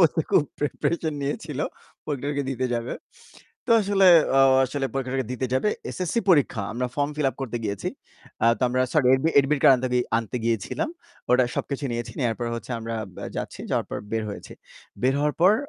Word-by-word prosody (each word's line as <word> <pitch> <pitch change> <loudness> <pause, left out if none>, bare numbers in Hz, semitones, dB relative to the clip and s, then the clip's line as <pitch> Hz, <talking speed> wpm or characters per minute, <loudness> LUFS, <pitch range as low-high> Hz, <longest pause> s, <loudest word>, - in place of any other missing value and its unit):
তো - - +1
খুব - - +5 0.2
প্রিপারেশন 155 +2 -1
নিয়েছিল। 145 0 -4 0.5
পরীক্ষাটাকে 145 0 -2
দিতে 130 0 -1
যাবে। 115 +1 -2 0.7
তো - - +3
আসলে 195 -1 +4 0.3
আ - - +7 0.2
আসলে 135 +1 -2
পরীক্ষাটাকে 130 -1 -2
দিতে 130 +1 -2
যাবে। 130 +11 +2 0.2
এসএসসি 185 +5 -1
পরীক্ষা। 140 - +3
আমরা 125 +1 -1
ফর্ম 145 0 +1
ফিল 150 -3 +1
আপ - - -22
করতে 120 -2 -3
গিয়েছি। 100 -1 -3 0.7
তো - - 0
আমরা 130 +1 0
আ - - -10
সরি 145 -5 +3 0.3
এডমিট-কার্ড 135 -2 +4 0.4
আনতে 115 +2 -3
গিয়েছিলাম। 115 - -1 0.4
ওটা 125 0 +5
সবকিছু 140 0 -3
নিয়েছি, 120 0 -4
নেয়ার 120 -4 +1
পর 120 - -2
হচ্ছে 115 +2 -7
আমরা 115 0 -5 0.3
আ - - -4
যাচ্ছি, - - -5
যাওয়ার - - +1
পর - - -3
বের 110 -1 0
হয়েছি। 100 - -8 0.5
বের 130 +1 +4
হওয়ার 150 0 +1
পর 185 +4 +7
135 Hz, 170 wpm, -25 LUFS, 120-150 Hz, 0.7 s, আ